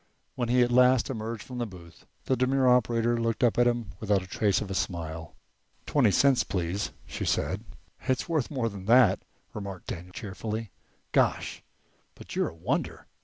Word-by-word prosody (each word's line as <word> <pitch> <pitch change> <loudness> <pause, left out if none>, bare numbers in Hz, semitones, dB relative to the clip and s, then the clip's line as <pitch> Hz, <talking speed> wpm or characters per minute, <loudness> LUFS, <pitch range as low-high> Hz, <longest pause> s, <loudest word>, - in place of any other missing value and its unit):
When 120 -2 -2
he 125 0 +5
at 120 - 0
last 125 +1 +4
emerged 110 -2 -4
from 125 -1 -7
the 120 - -1
booth 85 -4 -14 0.2
the 130 - +2
demure 130 +1 +2
operator 120 -1 +3
looked 115 +1 0
up 120 0 +3
at 120 - +5
him 120 -5 -1
without 105 -3 +1
the - - -8
trace 100 0 +1
of 100 -3 -5
a - - -1
smile. 85 -3 -4 0.5
"Twenty 135 -7 +3
cents, 135 +6 +4
please," 95 +1 -2 0.2
she - - -5
said. - - 0 0.4
"It's 130 +5 0
worth 160 -7 0
more 130 -6 -1
than 100 -4 -7
that," 115 -3 +5 0.3
remarked 100 -3 -6
Daniel 90 +1 -7
cheerfully. 105 +2 -5 0.4
"Gosh, - - +1 0.5
but - - -10
you're - - +1
a - - -14
wonder! 80 - -2
115 Hz, 175 wpm, -28 LUFS, 95-125 Hz, 0.5 s, he